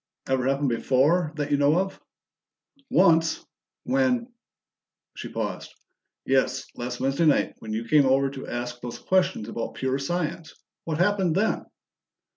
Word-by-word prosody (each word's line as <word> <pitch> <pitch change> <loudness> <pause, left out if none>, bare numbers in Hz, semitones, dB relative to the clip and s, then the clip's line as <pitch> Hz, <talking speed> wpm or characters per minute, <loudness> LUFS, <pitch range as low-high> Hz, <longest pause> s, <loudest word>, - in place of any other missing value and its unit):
"Ever 130 -1 +1
happen 140 +1 +1
before, 140 +7 +2
that 145 -1 -3
you 145 - +4
know 145 +3 +3
of?" 190 +1 -2 0.9
"Once. 165 -3 +3 0.4
When 255 -2 +1 0.4
" - - -65
She - - -7
paused. - - -4 0.5
"Yes. 130 -1 +1
Last 120 0 -5
Wednesday 135 +5 +1
night, 145 - +3
when 110 - -8
you 115 +2 -3
came 145 +1 +5
over 135 +1 +3
to 135 -1 -8
ask 120 0 -5
those 120 -1 -6
questions 185 - +1
about 115 - -5
pure 130 +1 -1
science. 160 +2 -3 0.3
What 160 -2 -2
happened 185 -2 +2
then?" 215 +4 0
145 Hz, 145 wpm, -25 LUFS, 130-175 Hz, 0.9 s, came